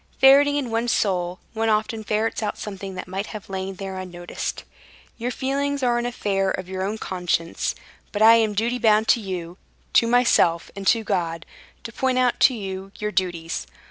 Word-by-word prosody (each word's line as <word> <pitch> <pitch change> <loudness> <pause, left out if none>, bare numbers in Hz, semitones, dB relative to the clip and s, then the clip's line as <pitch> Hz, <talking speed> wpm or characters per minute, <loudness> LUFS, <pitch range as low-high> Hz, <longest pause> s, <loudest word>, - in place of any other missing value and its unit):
"Ferreting 280 +2 +7
in 270 -5 -2
one's 230 +1 0
soul, 180 -5 0 0.2
one 225 0 0
often 220 +1 0
ferrets 215 +2 -1
out 210 -1 -2
something 195 -2 -6
that 185 - -6
might 195 +3 -4
have 210 -3 -9
lain 190 0 -4
there 190 0 -6
unnoticed. 175 -1 -5 0.6
Your 240 +2 -2
feelings 280 +2 -1
are 240 -1 +2
an 240 - -1
affair 195 -5 0
of 185 -1 -3
your 185 0 -4
own 205 +3 -2
conscience; 175 -4 -2 0.4
but 205 - -3
I 225 +1 +9
am 220 -1 +3
in - - -5
duty 235 +4 0
bound 220 -1 +4
to - - +5
you, 180 -3 -6 0.3
to 230 - +5
myself, 230 -8 +3
and 195 -1 -5
to 225 +2 +4
God, 170 -4 -2 0.4
to 230 - -8
point 260 +1 0
out 250 -1 +2
to 260 - +5
you 195 -2 -6
your 210 0 -3
duties. 175 -3 -2
210 Hz, 190 wpm, -23 LUFS, 185-235 Hz, 0.6 s, I